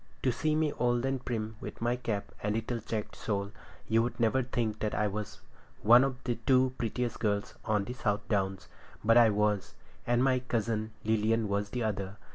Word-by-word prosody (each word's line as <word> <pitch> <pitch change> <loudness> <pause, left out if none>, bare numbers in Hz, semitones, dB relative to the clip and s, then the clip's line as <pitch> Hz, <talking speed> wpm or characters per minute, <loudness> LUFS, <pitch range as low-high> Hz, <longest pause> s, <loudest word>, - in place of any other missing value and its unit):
To 130 - +3
see 155 +6 0
me 155 -1 +1
old 120 0 +2
and 135 -1 -1
prim, 110 -3 -3
with - - -7
my 120 +1 +1
cap 115 -5 -3
and 105 +1 0
little 115 +1 -2
checked 105 -1 -4
shawl, 100 -2 -2 0.4
you'd 115 +2 +1
never 120 +3 +3
think 115 -4 -2
that 110 - -1
I 105 - +1
was 105 0 -4 0.4
once - - -14
one 120 +4 +8
of 135 -1 -2
the 120 -2 -2
two 130 -1 +4
prettiest 120 +1 -2
girls 100 -2 0
on 105 -2 +2
all - - -5
the 125 - -5
South 105 -4 -1
Downs. 95 -2 -1 0.4
But 115 +2 +5
I 115 -2 +7
was, 105 -1 0 0.3
and 120 +1 +3
my 130 -1 +3
cousin 115 -3 -1
Lilian 110 0 +2
was 100 0 -1
the 125 +1 -2
other. 100 -2 -3
115 Hz, 200 wpm, -30 LUFS, 105-125 Hz, 0.4 s, one